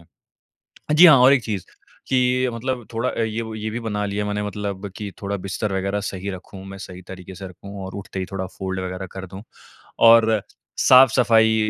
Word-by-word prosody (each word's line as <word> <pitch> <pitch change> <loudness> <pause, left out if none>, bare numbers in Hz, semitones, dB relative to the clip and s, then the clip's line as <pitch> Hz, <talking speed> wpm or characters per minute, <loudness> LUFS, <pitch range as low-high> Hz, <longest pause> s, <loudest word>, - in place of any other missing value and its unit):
हाँ 85 - -27 0.7
जी 175 +2 +10
और 135 -2 +7
एक 135 -4 +3
चीज़, 100 -5 -3 0.4
कि 125 0 +2
मतलब 120 0 -4
थोड़ा 115 +3 0
अ, - - -4
ये 110 +1 -2
वो 110 -1 -7
ये 110 0 -4
भी 120 +2 -4
बना 105 -2 -2
लिया 100 +1 -2
मैंने 105 0 -2
मतलब 100 -1 -5
कि 105 -2 -5
थोड़ा 100 0 -2
बिस्तर 100 +2 -2
वग़ैरह 100 +2 -1
सही 95 +1 -5
रखूँ, 95 +1 -10
मैं 95 0 -9
सही 90 -1 -9
तरीके 95 0 -9
से 95 -1 -8
रखूँ 100 +2 -10
और 95 - -9
उठते 95 -1 -8
ही 95 - -3
थोड़ा 95 -1 -3
फ़ोल्ड 95 -1 -3
वग़ैरह 95 +1 -5
कर 95 0 -7
दूँ, 95 +3 -10 0.6
और 115 -2 +6 0.4
साफ-सफाई 115 -4 +5
105 Hz, 195 wpm, -22 LUFS, 95-115 Hz, 0.7 s, जी